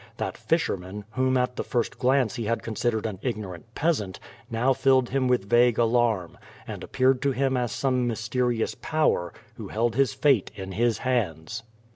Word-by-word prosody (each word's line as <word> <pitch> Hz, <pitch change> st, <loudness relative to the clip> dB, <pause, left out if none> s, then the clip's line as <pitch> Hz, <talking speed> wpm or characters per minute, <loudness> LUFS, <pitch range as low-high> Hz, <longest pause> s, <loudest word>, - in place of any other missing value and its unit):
That -, -, -3 dB
fisherman, 95 Hz, +2 st, -2 dB
whom 130 Hz, +1 st, +1 dB
at 125 Hz, 0 st, 0 dB
the -, -, -1 dB
first 120 Hz, -3 st, -2 dB
glance 130 Hz, -2 st, +2 dB
he 115 Hz, -3 st, -3 dB
had 115 Hz, +2 st, -1 dB
considered 115 Hz, 0 st, -1 dB
an 105 Hz, -4 st, -4 dB
ignorant 110 Hz, -3 st, -5 dB
peasant, 140 Hz, -, 0 dB, 0.3 s
now 120 Hz, +4 st, +2 dB
filled 130 Hz, -1 st, +3 dB
him 130 Hz, 0 st, +1 dB
with 125 Hz, -6 st, +1 dB
vague 120 Hz, +1 st, +4 dB
alarm, 115 Hz, -6 st, +1 dB, 0.3 s
and -, -, -7 dB
appeared 130 Hz, 0 st, +2 dB
to 140 Hz, -1 st, +1 dB
him 135 Hz, 0 st, +1 dB
as 125 Hz, -2 st, -1 dB
some 130 Hz, -2 st, 0 dB
mysterious 115 Hz, +1 st, -1 dB
power 155 Hz, -, 0 dB, 0.3 s
who -, -, -7 dB
held 115 Hz, +1 st, 0 dB
his 135 Hz, -3 st, +2 dB
fate 135 Hz, -9 st, +3 dB
in 95 Hz, -1 st, -6 dB
his 115 Hz, +2 st, +1 dB
hands. 105 Hz, -6 st, -2 dB
120 Hz, 170 wpm, -26 LUFS, 110-130 Hz, 0.3 s, vague